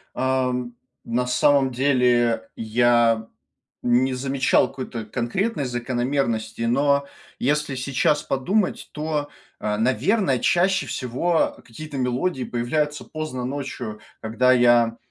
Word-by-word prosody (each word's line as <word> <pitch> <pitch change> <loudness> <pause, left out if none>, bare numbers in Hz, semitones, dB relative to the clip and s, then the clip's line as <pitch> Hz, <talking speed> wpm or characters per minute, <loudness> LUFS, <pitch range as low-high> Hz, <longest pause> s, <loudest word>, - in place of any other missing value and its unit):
Ам, 125 -2 -1 0.3
на 125 +2 -1
самом 135 0 +3
деле, 120 -3 +2
я 115 0 +2 0.5
не 125 +2 +2
замечал 135 +1 +2
какой-то 130 -4 -6
конкретной 140 - -2
закономерности, 120 -2 -2
но 140 +4 +2 0.3
если 145 +1 0
сейчас 140 +3 +1
подумать, 180 +10 -1
то, 150 -1 -3 0.3
а, 105 0 -1
наверно, 130 - +1
чаще 180 +2 +2
всего 130 +8 0
какие-то 145 +5 -8
мелодии 130 +3 -1
появляются 150 +6 -2
поздно 155 -6 -5
ночью, 130 -5 -5 0.2
когда 120 +3 +2
я, 120 -2 +4
130 Hz, 105 wpm, -23 LUFS, 120-145 Hz, 0.5 s, я